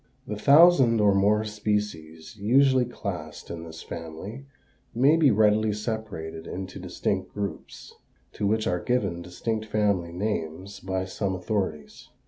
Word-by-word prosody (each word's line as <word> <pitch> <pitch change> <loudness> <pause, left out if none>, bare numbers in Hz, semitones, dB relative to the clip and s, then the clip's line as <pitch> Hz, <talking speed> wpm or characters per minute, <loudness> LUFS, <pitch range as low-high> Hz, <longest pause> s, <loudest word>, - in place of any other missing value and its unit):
The 105 - -4
thousand 140 -1 +6
or 105 -1 +4
more 105 +2 +3
species 105 -7 -3
usually 130 +5 +3
classed 90 -10 -6
in 85 -1 -6
this 80 0 -9
family 90 +11 -8 0.5
may 135 +6 +5
be 160 -4 +5
readily 105 -1 +3
separated 100 -7 -5
into 95 0 -6
distinct - - -3
groups, 100 -1 -6 0.4
to 105 - -1
which 110 +1 +1
are 90 -1 0
given 100 -9 -1
distinct 110 +6 -3
family 100 -5 0
names 95 0 -4
by 95 -1 -3
some 95 +1 -2
authorities. 90 -5 -4
105 Hz, 130 wpm, -26 LUFS, 90-110 Hz, 0.5 s, thousand